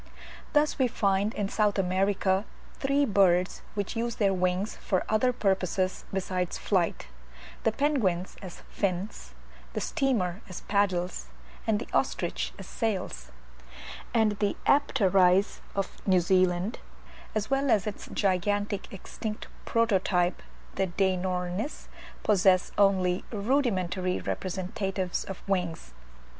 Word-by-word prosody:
Thus 295 0 +3
we 260 - +4
find 200 -3 +1
in 205 - -1
South 210 0 +1
America 190 +1 +2 0.4
three 280 +1 +2
birds 185 -5 +3
which 205 +2 -2
use 235 0 -1
their 200 -2 +2
wings 185 +3 0
for 185 -3 -1
other 220 +4 +3
purposes 190 -4 0
besides 185 -2 -2
flight; 180 - 0 0.6
the 225 - +2
penguins 215 - 0
as 185 -3 -9
fins, 185 - -3 0.4
the - - -1
steamer 210 -9 0
as 185 - -7
paddles, 185 - 0 0.4
and 220 -2 +3
the 220 - -5
ostrich - - 0
as - - -8
sails: 185 - -3 0.8
and 215 -3 +2
the 205 -1 0
Apteryz 195 -8 +4 0.2
of 195 -1 -3
New 185 -2 +5
Zealand, 185 +3 +2 0.6
as 215 +3 -1
well 275 0 +2
as 210 -5 +3
its 210 -2 -5
gigantic 205 +1 0
extinct 210 +2 -6 0.2
prototype 190 -5 +2 0.3
the 190 - 0
Deinornis, 185 - -1 0.3
possess 190 -2 +4
only 190 -3 +3
rudimentary 200 -6 0
representatives 190 0 -2
of 195 0 -8
wings. 180 - -2
195 Hz, 115 wpm, -28 LUFS, 185-215 Hz, 0.8 s, New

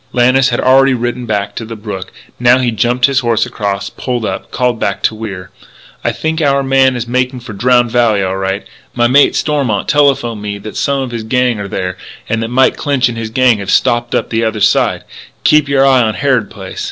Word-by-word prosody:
Lannis 130 +2 +3
had - - -1
already 135 +1 +4
ridden 120 0 -3
down 100 0 -1
to - - -6
the 115 +1 -7
brook. 100 -3 -7 0.3
Now 120 +1 +5
he 125 -2 0
jumped 120 +3 +1
his 135 -1 +2
horse 120 -3 +1
across, 100 -5 -4
pulled 125 -3 -3
up, 95 -1 -4
called 125 -2 -1
back 100 -2 -2
to - - +2
Wier: 100 -5 -7 0.5
"I - - +1
think 160 +1 -3
our 140 -2 +2
man 135 -1 +3
is 120 -1 -4
making 125 +1 -1
for 115 -2 -9
Drowned 120 +3 +2
Valley, 115 -5 +2
all 95 0 -2
right. 95 +1 -3 0.3
My 120 -1 +2
mate, 135 +4 +4
Stormont, 135 -10 -1
telephoned 135 -7 +1
me 105 -1 -4
that 105 +1 -9
some 140 -1 0
of 130 - -6
his 120 -1 -4
gang 125 0 0
are 100 - -4
there, 95 -1 -4 0.3
and 110 0 -1
that 115 - -2
Mike 130 +3 +2
Clinch 140 -4 +1
and 120 - -5
his 110 -1 -4
gang 120 -1 +2
have 100 - -6
them - - +1
stopped 120 0 +1
on - - +1
the 115 0 0
other 110 -1 -1
side! - - +2 0.4
Keep 150 -2 +3
your 135 -1 +3
eye 130 -2 +4
on 110 -2 0
Harrod 130 -7 0
Place!" - - -9
120 Hz, 225 wpm, -14 LUFS, 110-130 Hz, 0.5 s, Now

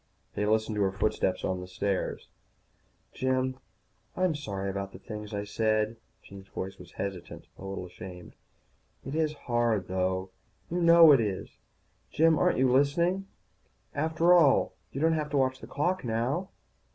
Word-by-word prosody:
They 105 - -1
listened 110 0 +1
to - - +1
her 95 -1 +2
footsteps 95 -1 0
on 95 -1 -1
the 90 - -8
stairs. 95 +1 -2 0.9
"Jim, 130 0 0 0.6
I'm 185 -2 +2
sorry 100 -10 -4
about 100 0 -4
the - - -9
things 105 +2 -8
I 100 -1 -3
said." 110 +1 0 0.3
Jean's 100 -1 -12
voice 95 +1 -6
was - - -13
hesitant, 95 -3 -6
a 95 - -9
little 95 -1 -5
ashamed. 90 0 -10 0.7
"It 135 - -5
is 155 -1 +1
hard, 120 -6 +1
though, 95 0 -1 0.4
you 175 +1 0
know 170 -1 +8
it 140 - +6
is 100 -4 -3 0.6
Jim, 160 0 +3
aren't 180 - +3
you 130 0 +3
listening? 170 +8 +2 0.7
After 160 +4 +3
all, 160 -6 +5 0.2
you 135 - -5
don't 160 +2 +3
have 155 -2 -1
to 145 - 0
watch 130 -1 +1
the - - -10
clock 180 +6 -1
now." 125 +10 -1
115 Hz, 160 wpm, -29 LUFS, 100-150 Hz, 0.9 s, know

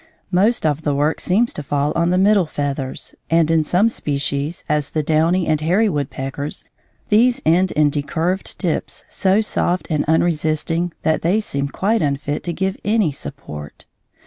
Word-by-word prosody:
Most 200 +3 +2
of 150 0 +1
the 145 -2 0
work 150 +3 +1
seems 220 +6 +2
to - - -5
fall 145 +1 -1
on 170 +1 +2
the 180 - +2
middle 195 -2 +4
feathers, 140 -3 -4 0.2
and 165 -1 +3
in 160 -1 +3
some 180 +8 +3
species, 145 -4 -2
as 150 -2 0
the 155 - -1
downy 165 +4 +2
and 155 -1 +1
the 155 - -5
hairy 205 +6 +3
woodpeckers, 140 -2 -4 0.4
these 235 +4 +4
end 175 +4 +3
in 150 -1 +3
decurved 165 +6 -2
tips 175 -5 -3
so 195 +2 +2
soft 180 -4 0
and 150 -2 +1
unresisting 160 +1 0
that 160 0 +1
they 180 +6 +2
seem 140 -9 -2
quite 210 +10 0
unfit 145 0 -1
to 175 - -1
give 190 +3 -2
any 210 -5 +2
support. 75 - -8
160 Hz, 170 wpm, -20 LUFS, 145-185 Hz, 0.4 s, middle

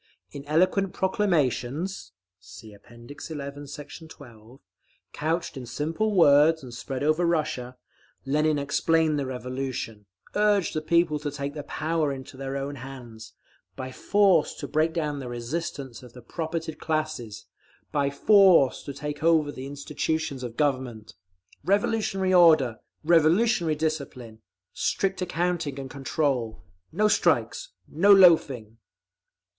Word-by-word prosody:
In 140 -1 -8
eloquent 185 +5 +1
proclamations, 170 - -1 0.3
(See 105 +3 -13
App. 100 - -19
XI, 140 +4 -8
Sect. 150 +3 -10
12) 120 -4 -15 0.5
couched 165 +2 -2
in 130 -2 -7
simple 165 - -2
words 155 -1 +5
and 125 -2 -9
spread 130 +2 -5
over 155 +3 +2
Russia, 150 -7 -1 0.5
Lenin 150 +2 +1
explained 155 +2 +1
the 135 - -3
Revolution, 125 -4 -5 0.3
urged 205 -3 +2
the 155 - -2
people 165 -1 +2
to 145 0 -3
take 140 0 -5
the 150 - -5
power 155 0 -1
into 135 -1 -8
their 135 +1 -4
own 140 +1 -5
hands, 120 -4 -10 0.4
by 130 0 -6
force 195 +1 +2
to - - -6
break 155 +1 +1
down 150 -4 -2
the 130 -2 -6
resistance 130 +1 -5
of 125 -2 -14
the 125 - -13
propertied 160 +3 -5
classes, 155 - -3 0.5
by 140 -1 +1
force 180 -3 +5
to 140 - -6
take 150 +1 -5
over 160 -2 +3
the 130 -1 -8
institutions 145 0 -3
of 120 -2 -7
Government. 130 -7 -2 0.5
Revolutionary 195 0 +1
order. 155 -10 +5 0.2
Revolutionary 170 +2 +3
discipline! 140 -8 -4 0.3
Strict 195 -1 -1
accounting 175 -5 -2
and 135 -1 -7
control! 135 - -2 0.3
No 210 +6 +2
strikes! - - +1
No 195 +6 +3
loafing! 140 - +5
150 Hz, 130 wpm, -26 LUFS, 130-165 Hz, 0.5 s, words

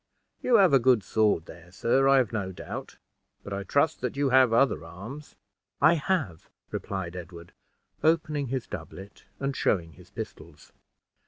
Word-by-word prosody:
You 250 - +3
have 190 -8 +6
a 135 - +7
good 120 -3 +3
sword 105 -6 +1
there, 85 +1 -13
sir, 130 +7 +2
I 135 0 +6
have 125 -3 +1
no 100 -4 -2
doubt; 90 - -8 0.5
but 100 - -6
I 100 - -3
trust 140 +10 +1
that 125 +2 -3
you 140 -1 +2
have 130 -2 +5
other 115 - +2
arms." 100 - -10 0.4
"I 155 +3 +6
have," 145 - -2 0.2
replied 95 -3 -4
Ed 90 -1 -7
ward, 85 0 -12 0.5
opening 155 -3 +1
his 130 -1 -3
doublet, 95 +1 -9
and 135 0 -2
showing 85 -10 0
his - - -17
pistols. - - -9
115 Hz, 165 wpm, -27 LUFS, 95-140 Hz, 0.5 s, a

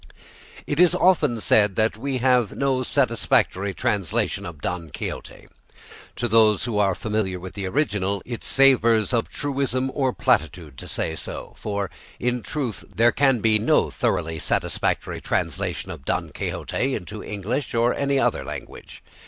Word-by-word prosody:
It - - -2
is 180 -1 +5
often 155 -10 +3
said 105 -3 +3
that 110 +1 +2
we 135 +4 -3
have 125 -3 +2
no 135 -2 +1
satisfactory 115 -6 +1
translation 95 -5 -1
of 80 -4 -9
"Don 85 +2 -4
Quixote." - - -7 0.7
To 120 - -1
those 110 -3 +4
who 115 -4 -1
are 100 -3 +2
familiar 105 -4 -2
with 95 +1 -8
the 100 -2 -4
original, 100 -5 -1
it 120 -2 -6
savours 115 -5 +4
of 115 -2 +1
truism 135 -2 -1
or 135 -2 +1
platitude 80 - 0
to - - -9
say 80 - -2
so, - - -7
for 100 -3 -3 0.3
in 125 0 0
truth 130 -7 -3
there 115 +1 +4
can 135 -4 +2
be 110 -1 +3
no - - +2
thoroughly 80 0 -1
satisfactory - - -1
translation - - -2
of - - -9
"Don - - -2
Quixote" 135 +1 -2
into 105 +1 -7
English 115 +7 -3
or 120 +1 +3
any 140 0 0
other - - +1
language. - - -9
115 Hz, 150 wpm, -23 LUFS, 100-130 Hz, 0.7 s, is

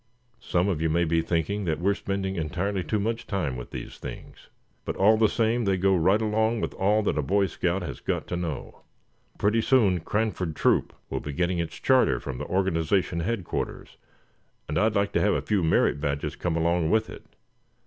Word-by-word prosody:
"Some 90 -4 0
of 90 -6 -1
you 80 - +1
may 85 +2 +2
be 85 0 +2
thinking 90 +5 -1
that 80 -2 -1
we're 100 +3 +2
spending 95 -1 -3
entirely 90 +4 -2
too 90 +7 -1
much 115 +2 -2
time 85 - -2
with 60 -1 -7
these - - -8
things; - - -10 0.3
but - - -4
all 105 +3 +5
the 110 -1 +3
same 115 +1 +1
they 95 -1 +2
go 95 +1 +3
right 95 +5 +3
along 110 +2 +1
with - - -3
all 105 +3 +2
that 75 -7 0
a - - +2
Boy 100 +7 +2
Scout 90 +1 -1
has 70 -7 -6
got - - -2
to - - -2
know. 85 -5 -5 0.6
Pretty 105 +3 +2
soon 110 -8 +3
Cranford 95 -3 -2
Troop - - +2 0.2
will - - -1
be 75 - -6
getting 90 +3 0
its 85 - -3
charter 130 - +3
from 65 -1 -6
the - - -4
organization 90 -1 0
headquarters, 95 +1 -3 0.7
and 75 +1 0
I'd 110 0 +2
like 100 0 +1
to - - +1
have 105 - +3
a - - 0
few 105 -3 +1
merit 80 -3 +2
badges 70 -1 -2
come 85 -2 -2
along 85 0 +1
with 110 +2 +2
it. - - -10
95 Hz, 200 wpm, -26 LUFS, 80-105 Hz, 0.7 s, all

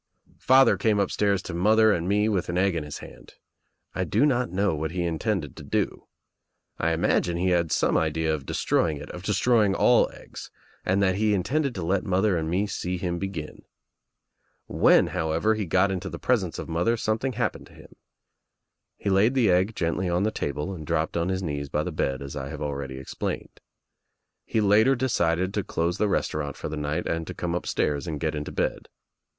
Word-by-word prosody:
Father 130 +1 +5
came 110 -4 +2
upstairs 100 0 +1
to 90 - -6
mother 110 +5 +4
and 85 0 -2
me 105 +1 +2
with 100 -6 -1
an 85 - -1
egg 95 0 +2
in 80 - -2
his 75 -1 -7
hand. - - -15 0.6
I 95 - -1
do 105 - +2
not 125 -7 +1
know 95 +1 +1
what 80 +1 -2
he 90 +2 -2
intended 80 -3 -2
to - - -9
do. - - -2 0.7
I 85 - +1
Imagine 85 0 +1
he 90 +2 +1
had 85 -2 +1
some - - +2
idea 80 0 +1
of 75 -3 -3
destroying 80 -3 +1
it, 75 +1 -9
of 90 - -8
destroying 105 +1 +2
all - - +4
eggs, - - -11 0.3
and 95 +2 +1
that 95 -1 +2
he 105 0 +2
Intended 135 - 0
to 90 -4 -4
let 95 +2 +1
mother 95 +1 +1
and 80 -1 -2
me 95 +5 +1
see 90 -2 -3
him 85 -1 -3
begin. 95 -5 -6 1.0
When, - - +4
however, 80 +7 +1
he 105 -3 -3
got 95 +4 +3
into 95 +1 -3
the - - -6
presence 100 -9 0
of - - -6
mother 85 +8 +1
something 110 +4 -1
happened 120 0 -2
to - - -19
him. - - -16 1.0
He 100 - -2
laid 105 +7 +3
the 115 -7 +4
egg 95 +5 +2
gently 90 +2 -1
on 90 +2 +1
the 110 - +1
table 75 +4 -3
and 80 -4 -7
dropped - - -1
on 85 +1 0
his 95 0 -2
knees 70 -4 -3
by 75 +2 0
the - - -4
bed 65 0 -2
as 70 +1 -7
I 70 -2 -5
have 75 - -7
already 70 -2 -4
explained. 65 - -5 0.9
He 110 - +1
later 105 +6 +4
decided 95 -8 0
to 105 - -1
close 85 0 -2
the 105 - +2
restaurant 75 -6 -2
for - - -5
the 80 - -4
night 75 0 -2
and 80 -1 -2
to - - -6
come 85 -1 -3
upstairs 75 -3 -1
and 75 -3 -3
get 80 0 -1
into 75 -1 -4
bed. - - -2
90 Hz, 200 wpm, -26 LUFS, 80-105 Hz, 1.0 s, Father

